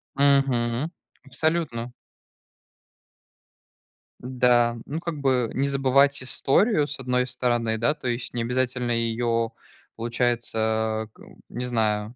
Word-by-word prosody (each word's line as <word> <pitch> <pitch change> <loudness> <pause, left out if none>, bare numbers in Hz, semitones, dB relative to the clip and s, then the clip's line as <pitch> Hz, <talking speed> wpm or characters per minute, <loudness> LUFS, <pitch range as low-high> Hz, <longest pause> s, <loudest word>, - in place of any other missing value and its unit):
Мгм. 135 -1 +2 0.3
Абсолютно. 135 -4 -1 2.3
Да. 125 -2 +2
Ну 155 +3 -4
как 170 -3 -5
бы 130 -4 +2
не 135 - 0
забывать 140 0 +3
историю, 145 - +2
с 145 - -6
одной 125 -1 0
стороны, 120 -3 0
да. 120 +7 +2
То 140 - -7
есть 120 0 -3
не 120 - -2
обязательно 125 0 -1
ее, 115 0 0 0.4
получается 110 -2 0
а, - - -11
к 105 - -23 0.3
не 125 +1 -5
знаю. 110 -2 -1
125 Hz, 115 wpm, -25 LUFS, 115-135 Hz, 2.3 s, забывать